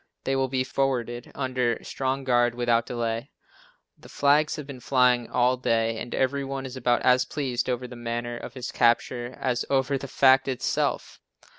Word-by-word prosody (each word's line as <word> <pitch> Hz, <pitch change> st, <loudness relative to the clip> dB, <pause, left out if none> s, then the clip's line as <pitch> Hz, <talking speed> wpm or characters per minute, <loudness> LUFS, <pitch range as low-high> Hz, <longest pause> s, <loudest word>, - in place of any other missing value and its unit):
They 135 Hz, -, 0 dB
will 135 Hz, 0 st, +1 dB
be 130 Hz, 0 st, 0 dB
forwarded 125 Hz, -3 st, -2 dB
under 130 Hz, -3 st, 0 dB
strong 135 Hz, 0 st, -2 dB
guard 120 Hz, -2 st, +2 dB
without 120 Hz, -1 st, +1 dB
delay." 115 Hz, -1 st, -3 dB, 0.7 s
The -, -, -15 dB
flags 145 Hz, +2 st, +2 dB
have 150 Hz, -, -7 dB
been 135 Hz, -2 st, -9 dB
flying 125 Hz, -2 st, +2 dB
all 125 Hz, +1 st, +2 dB
day, 115 Hz, -2 st, 0 dB
and 120 Hz, -, -5 dB
every 140 Hz, +1 st, 0 dB
one 135 Hz, 0 st, -4 dB
is 130 Hz, 0 st, -7 dB
about 120 Hz, -1 st, +1 dB
as 125 Hz, 0 st, +4 dB
pleased 130 Hz, -2 st, -2 dB
over 125 Hz, 0 st, -2 dB
the 125 Hz, -, -10 dB
manner 120 Hz, 0 st, -4 dB
of -, -, -8 dB
his 130 Hz, -1 st, -5 dB
capture 120 Hz, +1 st, +1 dB
as 125 Hz, -2 st, 0 dB
over 135 Hz, 0 st, +1 dB
the 140 Hz, -, -7 dB
fact 135 Hz, 0 st, +4 dB
itself. 130 Hz, -2 st, -1 dB
125 Hz, 175 wpm, -26 LUFS, 120-135 Hz, 0.7 s, as